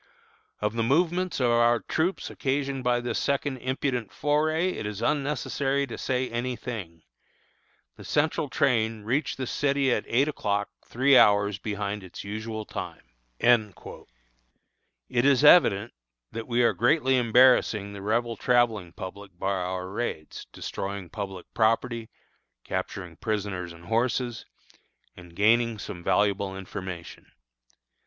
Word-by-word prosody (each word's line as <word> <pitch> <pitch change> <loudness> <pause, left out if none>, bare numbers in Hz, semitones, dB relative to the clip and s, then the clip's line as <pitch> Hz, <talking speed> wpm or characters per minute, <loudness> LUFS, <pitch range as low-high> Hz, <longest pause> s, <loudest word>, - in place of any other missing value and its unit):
"Of 105 0 0
the 115 - -1
movements 175 +9 +1
of 125 -2 +3
our 120 0 +4
troops 175 +4 -1
occasioned 135 -1 -2
by 120 -1 +2
this 120 - -2
second 140 -1 -1
impudent 130 -3 -2
foray 155 +4 +1
it 110 - -5
is 105 -1 -5
unnecessary 140 +1 0
to 120 - -7
say 130 -1 -1
any 120 +2 -3
thing. 95 -10 -7 0.9
The - - -11
Central 150 -1 0
train 115 -6 +1
reached 130 +8 -1
this 130 -2 -3
city 140 -2 +1
at - - -2
eight 135 +5 +2
o'clock, 100 -8 -1
three 130 +3 +3
hours 100 -3 +5
behind 105 0 -3
its 95 - -9
usual 110 +1 -5
time." - - -7 0.4
It 75 - -3
is 140 0 +4
evident 115 - +6 0.4
that 115 0 -6
we 120 0 +2
are 115 - +4
greatly 130 +1 +3
embarrassing 120 -4 +4
the 100 - -8
Rebel 115 +3 0
travelling 115 -7 +1
public 95 0 -9
by 95 +2 -1
our 90 0 -3
raids, 100 -6 -5
destroying 100 -2 -5
public 95 -4 -6
property, 115 +1 +1 0.5
capturing 90 -4 -5
prisoners 100 -5 -3
and 85 0 -13
horses, 120 +1 -1 0.7
and 85 -2 -14
gaining 115 +3 +3
some 90 -3 -7
valuable 100 -1 +1
information. 95 -2 -8
115 Hz, 130 wpm, -27 LUFS, 100-130 Hz, 0.9 s, evident